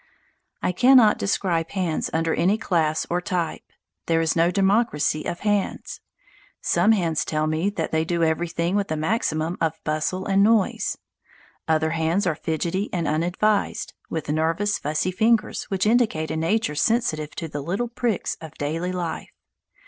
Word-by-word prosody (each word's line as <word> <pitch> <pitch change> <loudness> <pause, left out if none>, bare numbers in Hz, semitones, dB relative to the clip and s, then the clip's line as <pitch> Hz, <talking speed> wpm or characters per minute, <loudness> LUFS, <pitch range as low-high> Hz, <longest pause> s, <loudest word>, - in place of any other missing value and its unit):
I - - +2
cannot 245 +2 +5
describe 175 -4 0
hands 180 -5 -1
under 165 0 0
any 195 +5 +2
class 160 -7 0
or 175 +1 -1
type; 175 -2 -2 0.5
there 165 -1 +2
is 165 -1 +1
no 170 +1 +3
democracy 195 -6 +1
of 175 - -4
hands. 205 -2 -1 0.6
Some 220 - +3
hands 170 -6 0
tell 155 0 -1
me 155 +5 0
that 170 -6 -3
they 160 0 +1
do 170 0 0
everything 170 +2 0
with 200 -1 0
the 155 - -2
maximum 160 -2 -1
of 160 -1 0
bustle 155 +5 -2
and 195 0 +3
noise. 215 -1 +2 0.7
Other 160 0 +2
hands 165 +4 0
are 180 - +2
fidgety 165 +6 -2
and 170 -3 -1
unadvised, 180 +7 0 0.2
with 160 -3 -4
nervous, 165 +7 0
fussy 155 +5 -1
fingers 220 +4 +1
which 190 0 -1
indicate 215 -9 +2
a - - -2
nature 170 +4 0
sensitive 155 -5 0
to 165 - -4
the 145 -2 -5
little 190 +11 -2
pricks 235 -3 -2
of 160 -2 -10
daily 165 +5 -2
life. 175 -3 -4
170 Hz, 155 wpm, -24 LUFS, 160-200 Hz, 0.7 s, cannot